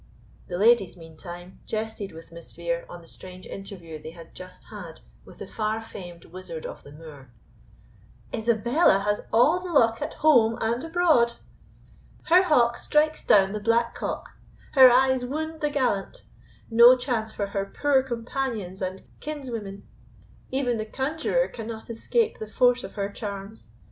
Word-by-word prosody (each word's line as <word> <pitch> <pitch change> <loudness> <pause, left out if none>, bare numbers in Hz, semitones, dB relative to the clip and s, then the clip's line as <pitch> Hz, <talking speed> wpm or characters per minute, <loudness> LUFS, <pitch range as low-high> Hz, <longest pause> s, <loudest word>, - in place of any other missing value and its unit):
The 175 - -4
ladies, 210 -3 +3
meantime, 175 +2 -11
jested 215 -2 -4
with 165 +1 -13
Miss 170 0 -12
Vere 170 0 -3
on 175 -1 -10
the - - -17
strange 185 +1 -11
interview 175 -6 -9
they 155 - -8
had 165 0 -13
just 185 0 -12
had - - -9 0.3
with - - -15
the - - -7
far 215 0 -2
famed 175 -6 -10
wizard 170 -2 -8
of - - -7
the 145 - -14
Moor. 145 -4 -12 1.0
"Isabella 235 - +2
has 210 0 0
all 275 +10 +4
the 365 -1 -7
luck 230 -7 +3
at - - -4
home 235 -7 +4
and 230 +3 -1
abroad! 325 -8 +3 0.9
Her 355 +2 +6
hawk 245 -10 +3
strikes 305 +1 +1
down 195 -1 +5
the 210 - -3
black 230 +2 +1
cock; - - -5 0.4
her 260 -2 +9
eyes 260 +1 +3
wound 315 +5 -4
the 300 - +1
gallant; 255 -9 -1 0.5
no 235 +3 +8
chance 240 -4 -2
for 205 - -3
her 195 - 0 0.2
poor 285 -2 +4
companions 235 -6 -4
and 185 0 -4 0.2
kinswomen; 235 -10 -6 0.7
even 250 -3 -1
the 215 - -3
conjuror 315 - -1
cannot 225 0 -8
escape 445 - 0
the 215 - -6
force 245 +2 +2
of - - -8
her 200 -1 -3
charms. 200 - -8
225 Hz, 155 wpm, -25 LUFS, 190-260 Hz, 1.0 s, her